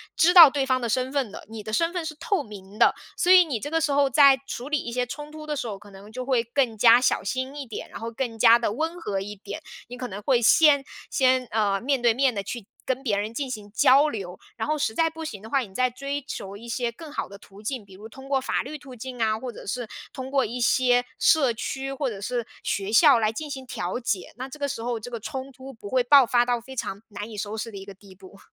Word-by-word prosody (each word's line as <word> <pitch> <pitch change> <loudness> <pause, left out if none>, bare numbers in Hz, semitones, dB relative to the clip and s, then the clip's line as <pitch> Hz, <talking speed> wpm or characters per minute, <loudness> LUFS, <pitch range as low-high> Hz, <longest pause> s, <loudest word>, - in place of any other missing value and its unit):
知 345 +3 +4
道 340 -5 +11
对 275 -1 -1
方 260 -1 +1
的 235 - -1
身 255 +3 0
份 270 -7 -1
的， - - -10
你 220 -1 -7
的 215 +1 -7
身 335 +8 +2
份 355 -3 -3
是 310 -1 -5
透 330 +4 -1
明 205 -1 -12
的， - - +5 0.2
所 360 - +3
以 370 -1 +9
你 270 -8 -3
这 290 - -5
个 325 +1 +1
时 310 -2 +1
候 280 -1 +3
在 275 0 +6
处 255 +2 -6
理 300 -1 +1
一 235 - -6
些 250 0 0
冲 295 +4 -8
突 310 0 -9
的 300 -1 -3
时 245 - -3
候， 205 -3 -5
可 205 +1 -16
能 195 +2 -13
就 255 +2 -6
会 255 -3 +2
更 235 -1 0
加 230 +2 +7
小 - - +1
心 260 +2 -3
一 285 -2 -6
点， 225 - -7
然 - - -9
后 230 +1 -5
更 230 -1 -4
加 230 0 +7
地 230 - -1
温 320 +9 -3
和 200 -9 -2
一 205 +2 -6
点， 200 0 -8 0.3
你 245 +1 -9
可 250 - -4
能 205 -2 -7
会 245 +2 +2
先 285 +4 +5 0.3
先， 255 -1 +2
呃， 205 -2 +1
面 270 0 0
对 235 -1 +4
面 260 +1 +2
的 200 - -3
去 225 +2 -6 0.2
跟 260 +1 -2
别 215 -6 0
人 210 +2 -3
进 270 +2 -3
行 210 -4 -7
交 275 +6 +5
流， 190 -8 -6 0.2
然 220 - -3
后 305 0 0
实 225 -6 -1
在 325 +6 +2
不 320 0 -8
行 210 -10 -7
的 220 - -11
话， 275 - +2
你 215 -7 -6
再 255 0 +2
追 275 +3 -4
求 200 -7 -7
一 230 +4 -11
些 240 0 -1
更 305 +6 -11
好 - - -3
的 200 - -11
途 200 0 -16
径， 220 0 -4
比 195 - -16
如 205 +4 -11
通 265 +4 -13
过 275 -1 +2
法 260 - -1
律 300 +4 -7
途 275 -3 -12
径 245 +1 -7
啊， 220 -1 +2
或 250 +2 -6
者 - - -12
是 245 +4 -3 0.3
通 260 0 -7
过 275 -1 +2
一 245 +3 -5
些 245 0 +3
社 285 -6 +4
区 270 +4 -4
或 275 0 -2
者 200 -4 -7
是 240 +2 -3 0.2
学 200 +1 -2
校 275 0 +7
来 215 -1 +1
进 300 +6 -6
行 265 -2 -6
调 185 -3 -4
解， 215 -7 -3
那 260 +1 -5
这 270 - -10
个 285 - -1
时 225 - -4
候 240 0 -2
这 245 +3 -9
个 235 - -4
冲 265 +5 -6
突 265 +1 -11
不 210 -4 -10
会 255 +1 +2
爆 275 +1 +7
发 240 +1 +3
到 240 -1 0
非 265 +3 -11
常 200 -5 -4
难 205 +1 -7
以 215 - -9
收 205 +2 -4
拾 225 +1 -5
的 200 - -9
一 195 - -8
个 200 - -10
地 195 0 -17
步。 195 +1 -15
245 Hz, 300 characters per minute, -25 LUFS, 220-275 Hz, 0.3 s, 道